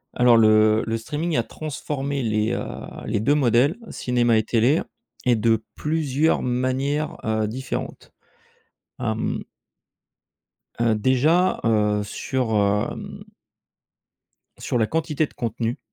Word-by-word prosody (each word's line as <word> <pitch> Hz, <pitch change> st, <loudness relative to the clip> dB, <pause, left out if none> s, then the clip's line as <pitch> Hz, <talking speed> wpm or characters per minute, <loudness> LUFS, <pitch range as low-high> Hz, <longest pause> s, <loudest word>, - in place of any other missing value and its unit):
Alors 120 Hz, -1 st, +5 dB
le 110 Hz, 0 st, +5 dB
le 115 Hz, 0 st, -1 dB
streaming 155 Hz, +6 st, -2 dB
a 115 Hz, -, +2 dB
transformé 140 Hz, -2 st, -4 dB
les, 110 Hz, -1 st, 0 dB
heu -, -, -2 dB, 0.4 s
les 105 Hz, -, -1 dB
2 140 Hz, +7 st, +2 dB
modèles, 130 Hz, -, +3 dB
cinéma 120 Hz, -2 st, +1 dB
et 110 Hz, -, +2 dB
télé, 120 Hz, +7 st, +2 dB, 0.4 s
et 125 Hz, -1 st, +4 dB
de 110 Hz, 0 st, +1 dB
plusieurs 155 Hz, 0 st, 0 dB
manières, 130 Hz, +4 st, -1 dB
heu, 110 Hz, -1 st, 0 dB
différentes. 130 Hz, +4 st, -5 dB, 0.9 s
Hem -, -, -2 dB, 1.4 s
Heu, 115 Hz, -2 st, +3 dB
déjà, 150 Hz, -, +2 dB
heu, 105 Hz, -2 st, +2 dB
sur, 120 Hz, +3 st, -3 dB, 0.4 s
hem -, -, -8 dB, 1.4 s
sur 125 Hz, -, -1 dB
la 110 Hz, -, +3 dB
quantité 155 Hz, +2 st, 0 dB
de -, -, -16 dB
contenu 115 Hz, -2 st, -3 dB
125 Hz, 115 wpm, -23 LUFS, 110-145 Hz, 1.4 s, Alors